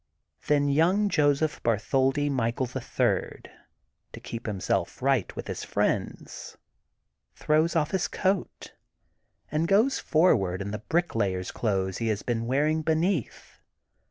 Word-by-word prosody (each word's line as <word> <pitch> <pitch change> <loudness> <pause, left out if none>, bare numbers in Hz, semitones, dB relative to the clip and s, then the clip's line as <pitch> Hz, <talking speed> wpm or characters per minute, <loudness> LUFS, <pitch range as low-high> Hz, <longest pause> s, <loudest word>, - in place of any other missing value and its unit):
Then 145 -1 +3
young 175 +9 +3
Joseph 150 -1 +1
Bartholdi 130 +6 +1
Michael, 125 -2 0
the 125 - -6
Third, - - -1 0.6
to - - -8
keep 115 0 -7
himself 100 -4 -2
right 135 -6 +1
with - - -6
his - - -5
friends, - - -3 0.8
throws 155 +3 +1
off 155 -1 +1
his 190 -2 0
coat, 190 -1 -2 0.8
and 155 +3 0
goes 220 +8 +3
forward 100 - +2
in 100 +1 -4
the 105 - -4
bricklayer 110 - 0
*s 90 - -6
clothes 95 -4 -1
he 115 - -1
has 105 -2 -1
been 115 -1 -2
wearing 150 +5 +1
beneath. 160 - -1
140 Hz, 130 wpm, -27 LUFS, 115-160 Hz, 0.8 s, Then